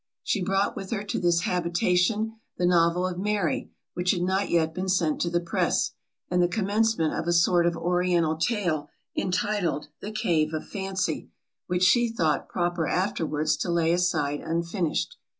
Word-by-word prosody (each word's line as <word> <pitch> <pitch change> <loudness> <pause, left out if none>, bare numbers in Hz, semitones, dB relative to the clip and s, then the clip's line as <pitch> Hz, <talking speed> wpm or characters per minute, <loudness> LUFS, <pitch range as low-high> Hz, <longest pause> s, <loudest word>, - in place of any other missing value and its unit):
She 205 - 0
brought 195 +2 +1
with 195 - -6
her 210 -3 -2
to 205 - -2
this 170 -1 +2
habitation, 180 +4 +1 0.2
the 180 - +1
novel 175 0 +3
of 180 -1 -3
Mary, 205 -4 -1 0.2
which 180 +1 -2
had 175 -2 +2
not 190 +2 0
yet 160 -2 +2
been 185 +3 -3
sent 170 -5 +1
to 170 - +1
the 175 0 +1
press, 170 -1 0 0.4
and 180 0 +1
the 175 - +4
commencement 210 -3 +1
of 165 - -3
a - - +2
sort 170 0 +4
of 170 -1 0
oriental 175 -1 +1
tale, 160 -5 -1 0.3
entitled, 185 -4 -1
the 210 - -6
Cave 160 -7 0
of 155 - -5
Fancy, 190 -2 -3 0.4
which 180 0 0
she 240 +5 +5
thought 160 -10 0
proper 175 -2 -1
afterwards 160 -5 0
to - - -3
lay 170 -1 +2
aside 150 -5 +1
unfinished. 170 - -2
180 Hz, 170 wpm, -26 LUFS, 170-195 Hz, 0.4 s, she